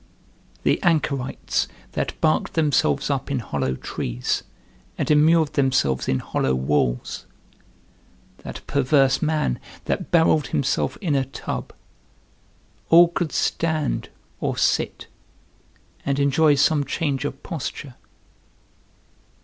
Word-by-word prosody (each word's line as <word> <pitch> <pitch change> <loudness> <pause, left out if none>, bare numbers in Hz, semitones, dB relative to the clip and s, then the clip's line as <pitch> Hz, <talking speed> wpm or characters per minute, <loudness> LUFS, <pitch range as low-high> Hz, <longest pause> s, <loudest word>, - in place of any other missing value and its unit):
The - - +2
anchorites 150 -7 0 0.2
that - - -3
barked 155 - +1
themselves 145 -3 +2
up 140 0 -2
in 140 - 0
hollow 70 - -2
trees - - -3 0.6
and - - 0
immured 155 +1 +4
themselves 130 - +1
in 65 - +2
hollow 65 0 -1
walls, 65 -2 -1 1.1
that - - -9
perverse 135 -1 +2
man 155 - 0 0.3
that - - -2
barrelled 160 -3 +3
himself 135 0 0
in 170 -7 0
a 135 -1 +1
tub, 135 - -5 1.2
all 170 +1 +8
could 170 -2 -2
stand 155 -4 -1 0.3
or - - -2
sit, - - 0 1.0
and 140 -1 0
enjoy 145 +2 +4
some 145 +1 +3
change 140 -2 -2
of 135 - -5
posture. 145 -5 -5
140 Hz, 110 wpm, -23 LUFS, 130-155 Hz, 1.2 s, all